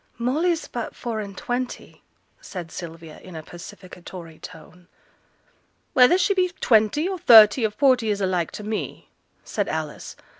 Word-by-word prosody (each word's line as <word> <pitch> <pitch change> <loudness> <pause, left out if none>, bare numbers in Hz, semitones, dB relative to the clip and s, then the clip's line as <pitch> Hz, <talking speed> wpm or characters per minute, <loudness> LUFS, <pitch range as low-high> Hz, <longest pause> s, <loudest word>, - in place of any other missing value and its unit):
'Molly's 310 +8 0
but 240 -2 -6
four 230 -3 -4
and 200 -3 -7
twenty,' 250 -2 -5 0.4
said 175 -4 -8
Sylvia, 165 -2 -9
in 185 -2 -12
a 160 - -7
pacificatory 175 -1 -11
tone. 175 +1 -13 1.1
'Whether 270 +6 +6
she 375 +2 +2
be 370 -1 +1
twenty, 225 - +3
or 380 -1 -4
thirty, 225 -2 +7
or - - -7
forty, 250 0 +2
is 205 -1 0
alike 185 -3 0
to 210 - -7
me,' 215 +1 -5 0.3
said - - -3
Alice. - - -5
215 Hz, 145 wpm, -23 LUFS, 180-255 Hz, 1.1 s, thirty